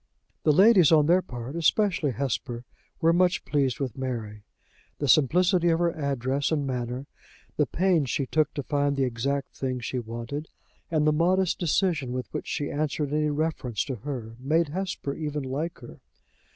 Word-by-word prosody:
The 155 Hz, -, +4 dB
ladies, 190 Hz, 0 st, +6 dB
on 155 Hz, -2 st, +6 dB
their 175 Hz, +4 st, +4 dB
part, 120 Hz, -1 st, -7 dB
especially 170 Hz, -1 st, +2 dB
Hesper, 125 Hz, -1 st, -3 dB, 0.4 s
were 165 Hz, 0 st, +4 dB
much 180 Hz, +1 st, +2 dB
pleased 135 Hz, -5 st, 0 dB
with 130 Hz, -6 st, -3 dB
Mary. 115 Hz, -5 st, -4 dB, 0.6 s
The 145 Hz, -, -2 dB
simplicity 175 Hz, -, +4 dB
of 165 Hz, -, +3 dB
her 170 Hz, 0 st, +2 dB
address 140 Hz, -1 st, -1 dB
and 145 Hz, -3 st, 0 dB
manner, 125 Hz, 0 st, -3 dB, 0.5 s
the -, -, +2 dB
pains 170 Hz, -6 st, +1 dB
she 135 Hz, -, 0 dB
took 155 Hz, +3 st, +1 dB
to 145 Hz, -, -3 dB
find 145 Hz, 0 st, 0 dB
the 135 Hz, -, +1 dB
exact 130 Hz, +3 st, -2 dB
thing 130 Hz, -1 st, -2 dB
she 125 Hz, +1 st, -3 dB
wanted, 120 Hz, +6 st, -5 dB, 0.4 s
and 155 Hz, -2 st, +1 dB
the 155 Hz, -, +4 dB
modest 180 Hz, +3 st, +2 dB
decision 160 Hz, -6 st, 0 dB
with 125 Hz, -1 st, -5 dB
which -, -, -4 dB
she 145 Hz, -, -2 dB
answered 150 Hz, -1 st, -2 dB
any 150 Hz, 0 st, +1 dB
reference 145 Hz, -7 st, -1 dB
to 130 Hz, -4 st, -4 dB
her, 115 Hz, -2 st, -6 dB
made 155 Hz, +4 st, +1 dB
Hesper 180 Hz, -4 st, -3 dB
even 150 Hz, -1 st, -3 dB
like 145 Hz, +6 st, -3 dB
her. 120 Hz, -, -11 dB
145 Hz, 170 wpm, -26 LUFS, 130-165 Hz, 0.6 s, ladies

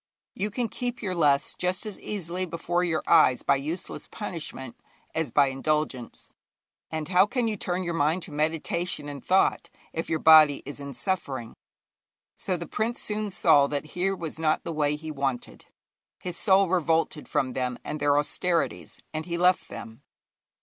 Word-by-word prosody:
You 205 Hz, +3 st, -2 dB
can 235 Hz, +3 st, -2 dB
keep 245 Hz, +1 st, -4 dB
your 190 Hz, -3 st, -1 dB
lusts 145 Hz, -4 st, +2 dB
just 180 Hz, +3 st, -2 dB
as 210 Hz, -3 st, -7 dB
easily 185 Hz, -2 st, -4 dB
before 175 Hz, +1 st, -1 dB
your 160 Hz, -3 st, 0 dB
eyes 155 Hz, -6 st, +5 dB
by -, -, +3 dB
useless 155 Hz, +6 st, -5 dB
punishment 160 Hz, -, -6 dB, 0.4 s
as 160 Hz, -4 st, -1 dB
by 140 Hz, +3 st, +4 dB
indulgence. 135 Hz, -2 st, -2 dB, 0.6 s
And 155 Hz, -1 st, -3 dB
how 190 Hz, +2 st, +5 dB
can 245 Hz, 0 st, 0 dB
you 220 Hz, -, -1 dB
turn 185 Hz, -2 st, -2 dB
your 170 Hz, -1 st, -2 dB
mind 165 Hz, +3 st, +1 dB
to -, -, -8 dB
meditation 160 Hz, +2 st, -1 dB
and 145 Hz, -2 st, -7 dB
thought 190 Hz, +1 st, +2 dB, 0.2 s
if 165 Hz, -, -3 dB
your 160 Hz, -, +1 dB
body 155 Hz, -2 st, +7 dB
is 145 Hz, +1 st, -7 dB
in 140 Hz, -2 st, -7 dB
suffering? 130 Hz, -4 st, -2 dB, 0.8 s
So 185 Hz, -2 st, -3 dB
the 170 Hz, -, -6 dB
prince 225 Hz, +8 st, -2 dB
soon 215 Hz, 0 st, -1 dB
saw 150 Hz, -6 st, +4 dB
that 145 Hz, +1 st, -3 dB
here 190 Hz, +2 st, 0 dB
was 165 Hz, -3 st, -6 dB
not 155 Hz, -1 st, +1 dB
the 165 Hz, -, -4 dB
way 150 Hz, -1 st, +1 dB
he 155 Hz, +1 st, -7 dB
wanted. 135 Hz, -4 st, -3 dB, 0.5 s
His 180 Hz, -1 st, -4 dB
soul 195 Hz, 0 st, +4 dB
revolted 165 Hz, -3 st, 0 dB
from 130 Hz, -2 st, 0 dB
them 125 Hz, -1 st, -2 dB
and 150 Hz, -, -4 dB
their 145 Hz, 0 st, +3 dB
austerities, 165 Hz, +3 st, -1 dB
and 155 Hz, +2 st, -4 dB
he 170 Hz, -1 st, -2 dB
left 180 Hz, +1 st, +3 dB
them. 115 Hz, +3 st, -9 dB
160 Hz, 170 wpm, -27 LUFS, 145-185 Hz, 0.8 s, body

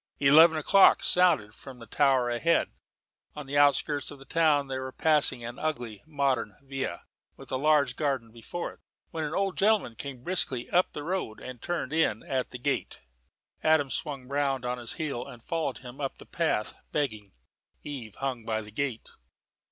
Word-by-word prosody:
Eleven 160 Hz, +4 st, +7 dB
o'clock 190 Hz, +6 st, +5 dB
sounded 160 Hz, -13 st, +3 dB
from 130 Hz, +1 st, -11 dB
a 115 Hz, -, -10 dB
tower 130 Hz, +1 st, +2 dB
ahead. 165 Hz, +8 st, +1 dB, 0.6 s
On 150 Hz, -1 st, -6 dB
the 140 Hz, +2 st, -5 dB
outskirts 145 Hz, 0 st, +3 dB
of 145 Hz, -, -9 dB
the 135 Hz, -, -14 dB
town 155 Hz, -3 st, +3 dB
they 135 Hz, -1 st, -4 dB
were 130 Hz, 0 st, -5 dB
passing 150 Hz, -5 st, +1 dB
an 120 Hz, +2 st, -7 dB
ugly 120 Hz, -9 st, -3 dB
modern 140 Hz, -7 st, 0 dB
villa 135 Hz, -9 st, -4 dB, 0.3 s
with -, -, -12 dB
a -, -, 0 dB
large 140 Hz, -2 st, +3 dB
garden 135 Hz, -7 st, -1 dB
before 120 Hz, +9 st, -6 dB
it, -, -, -23 dB, 0.3 s
when 160 Hz, -, -3 dB
an 150 Hz, +2 st, -3 dB
old 195 Hz, -1 st, 0 dB
gentleman 210 Hz, -, +3 dB
came 130 Hz, 0 st, -8 dB
briskly 135 Hz, -8 st, 0 dB
up 180 Hz, +1 st, +3 dB
the 150 Hz, -, -5 dB
road 170 Hz, -10 st, -3 dB
and 125 Hz, -2 st, -9 dB
turned 170 Hz, -5 st, -3 dB
in 160 Hz, -9 st, +1 dB
at 130 Hz, -2 st, -2 dB
the 125 Hz, -, -7 dB
gate. 135 Hz, +3 st, -2 dB, 0.6 s
Adam 155 Hz, -4 st, +3 dB
swung 140 Hz, -5 st, -3 dB
round 135 Hz, -2 st, 0 dB
on 125 Hz, 0 st, -2 dB
his 120 Hz, -2 st, -3 dB
heel 155 Hz, -8 st, -3 dB
and 120 Hz, -2 st, -12 dB
followed 160 Hz, -5 st, -2 dB
him 125 Hz, +2 st, -10 dB
up 135 Hz, -, -3 dB
the -, -, -13 dB
path, 160 Hz, -10 st, -1 dB, 0.2 s
begging. 110 Hz, -9 st, -2 dB, 0.5 s
Eve 125 Hz, -8 st, -7 dB
hung 130 Hz, -4 st, -3 dB
by 110 Hz, 0 st, -1 dB
the 105 Hz, -1 st, -11 dB
gate. 130 Hz, -1 st, -3 dB
140 Hz, 180 wpm, -28 LUFS, 125-155 Hz, 0.6 s, Eleven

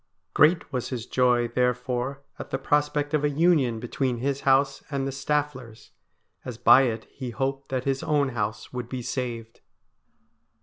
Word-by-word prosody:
Great 155 Hz, 0 st, +3 dB
was 125 Hz, -2 st, -2 dB
his 120 Hz, -3 st, -4 dB
joy 125 Hz, -2 st, +2 dB
therefore 125 Hz, +2 st, -1 dB, 0.2 s
at -, -, -7 dB
the -, -, -1 dB
prospect 145 Hz, +1 st, 0 dB
of 150 Hz, -1 st, +1 dB
a 150 Hz, -, +3 dB
union 145 Hz, -6 st, +2 dB
between 125 Hz, +1 st, -2 dB
his 140 Hz, +3 st, -2 dB
house 135 Hz, 0 st, +2 dB
and 140 Hz, -2 st, -2 dB
the -, -, -2 dB
Stafflers, 135 Hz, -4 st, -3 dB, 0.5 s
as 125 Hz, -3 st, -7 dB
by 120 Hz, +3 st, +7 dB
it 110 Hz, -1 st, -3 dB
he 130 Hz, -3 st, -6 dB
hoped 135 Hz, +3 st, -3 dB
that 130 Hz, -1 st, -2 dB
his 135 Hz, 0 st, -1 dB
own 145 Hz, -3 st, +1 dB
house 105 Hz, -2 st, -4 dB
would 125 Hz, -1 st, -5 dB
be 125 Hz, -2 st, -5 dB
saved. 115 Hz, -3 st, -5 dB
130 Hz, 165 wpm, -26 LUFS, 120-140 Hz, 0.5 s, by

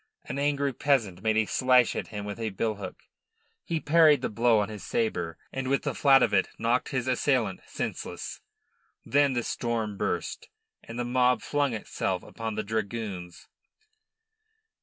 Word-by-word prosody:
An 130 Hz, -, -4 dB
angry 140 Hz, -1 st, +1 dB
peasant 115 Hz, -10 st, +1 dB
made 110 Hz, +1 st, +1 dB
a 110 Hz, -, +3 dB
slash 125 Hz, +1 st, +3 dB
at -, -, -3 dB
him 105 Hz, -1 st, -6 dB
with 105 Hz, +2 st, -6 dB
a 110 Hz, -1 st, -1 dB
billhook. 100 Hz, -1 st, -3 dB, 0.7 s
He 165 Hz, -, -2 dB
parried 155 Hz, -3 st, +5 dB
the -, -, 0 dB
blow 115 Hz, +1 st, +3 dB
on 105 Hz, -1 st, +1 dB
his 105 Hz, -1 st, -8 dB
sabre, 220 Hz, -, -1 dB, 0.2 s
and 135 Hz, -1 st, -3 dB
with 140 Hz, +1 st, +1 dB
the -, -, -1 dB
flat 135 Hz, -2 st, +5 dB
of 105 Hz, -, +1 dB
it 95 Hz, -, +3 dB
knocked 120 Hz, +2 st, +1 dB
his 130 Hz, -3 st, -2 dB
assailant 125 Hz, -6 st, +1 dB
senseless. -, -, -5 dB, 0.6 s
Then 140 Hz, -1 st, +3 dB
the 120 Hz, -1 st, 0 dB
storm 115 Hz, -4 st, -2 dB
burst, -, -, -3 dB, 0.4 s
and 115 Hz, -, -8 dB
the 120 Hz, -, -1 dB
mob 125 Hz, -1 st, +2 dB
flung 145 Hz, -3 st, 0 dB
itself 110 Hz, -, -2 dB
upon 110 Hz, -1 st, -5 dB
the 110 Hz, -, -2 dB
dragoons. 105 Hz, -4 st, -4 dB
120 Hz, 160 wpm, -28 LUFS, 105-135 Hz, 0.7 s, parried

